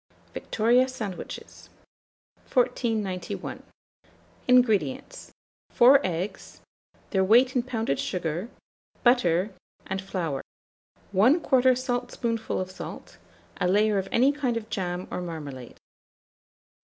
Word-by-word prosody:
VICTORIA 240 +4 +2
SANDWICHES. 215 -8 -7 0.8
1491. 220 - -1 0.9
INGREDIENTS. 250 - +2 0.4
4 265 +4 +6
eggs; 180 +3 -4 0.5
their 190 -2 +2
weight 245 +6 +5
in 250 - +3
pounded 225 - -2
sugar, 175 +4 -3 0.5
butter, 200 -6 +3 0.3
and 190 0 -3
flour; 170 -8 -3 0.7
1/4 255 - +4
saltspoonful 245 -2 -2
of 185 0 -4
salt, - - -9 0.4
a 180 - 0
layer 205 +2 +3
of 190 - -5
any 260 +4 +4
kind 265 -5 -1
of 220 -1 -7
jam 180 -1 -3
or - - -3
marmalade. 145 -8 -7
220 Hz, 95 wpm, -26 LUFS, 185-250 Hz, 0.9 s, 4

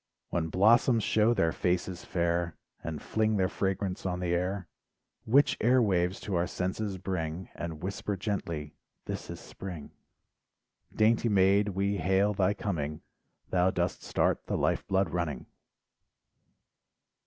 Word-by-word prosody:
When 85 -2 0
blossoms 110 +6 +4
show 110 +2 +3
their 80 -5 +2
faces 90 +1 -1
fair, 85 -2 -1 0.3
And 80 -2 -4
fling 110 -1 +1
their 95 -1 +3
fragrance 95 -1 -2
on 90 -1 -2
the 90 -1 -1
air, 90 +1 -1 0.6
Which 140 +6 +4
air 125 +3 +5
waves 95 -4 +1
to 100 - -4
our 85 0 +1
senses 95 +2 -3
bring, 90 -2 -4
And 80 -2 -6
whisper 100 +1 -3
gently, 85 -7 -3 0.3
"this - - -5
is - - -6
Spring." 90 -6 -8 1.0
Dainty 115 +2 +3
maid, 100 +1 +4
we 100 +1 0
hail 95 +4 +2
thy 100 0 +2
coming, 75 -7 -3 0.5
Thou 90 0 +3
dost 85 -1 -1
start - - 0
the - - 0
life - - 0
blood 95 -3 +1
running. 85 -7 -2
95 Hz, 135 wpm, -29 LUFS, 85-100 Hz, 1.0 s, air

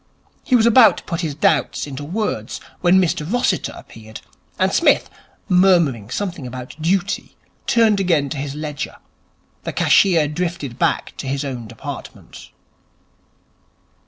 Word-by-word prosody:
He 255 - +2
was 225 -2 +4
about 235 0 +6
to - - -9
put 170 -2 -3
his 155 -5 -3
doubts 150 - +1
into 145 0 -7
words 165 - -3 0.2
when 180 +1 +4
Mr 165 -2 -1
Rossiter 245 -6 0
appeared, 110 0 -12 0.4
and - - +1
Psmith, - - +3 0.4
murmuring 170 - +3
something 175 -3 -4
about 125 0 -8
duty, 185 +4 -1 0.3
turned 220 -3 +3
again 165 -7 +2
to 155 - -4
his 140 0 -4
ledger. 150 -1 -5 0.7
The - - -5
cashier 170 -6 +4
drifted 150 -5 -4
back - - 0
to - - -6
his 140 +2 -2
own 125 -4 -5
department. 115 0 -9
160 Hz, 135 wpm, -20 LUFS, 135-190 Hz, 0.7 s, about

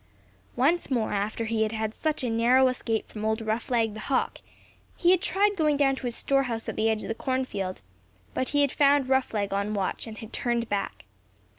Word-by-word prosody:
Once 295 +8 +2
more 235 -5 0
after 210 +3 -1
he 220 0 -1
had 220 0 -1
such 310 0 -2
a 245 - 0
narrow 245 +3 +4
escape 230 -3 -2
from 215 - -8
old 220 +1 +1
Roughleg 225 0 0
the 215 - -8
Hawk, 260 +4 -1 0.6
he 350 - +4
had 370 -1 +4
tried 405 +1 +2
going 305 -5 +2
down 275 -1 +3
to 255 - -4
his 235 - -3
store 275 0 +2
house 230 -4 -3
at - - -3
the 220 +1 +2
edge 220 -1 -1
of - - -6
the - - -1
cornfield, 225 -7 -3 0.5
but 255 - -1
he 290 0 +2
had 285 -2 +2
found 280 -2 +3
Roughleg 220 -7 +1
on 200 +2 -1
watch 195 +3 -2
and 220 -1 -8
had 220 -2 -10
turned 235 -1 -1
back. 200 -2 -3
235 Hz, 205 wpm, -27 LUFS, 220-270 Hz, 0.6 s, narrow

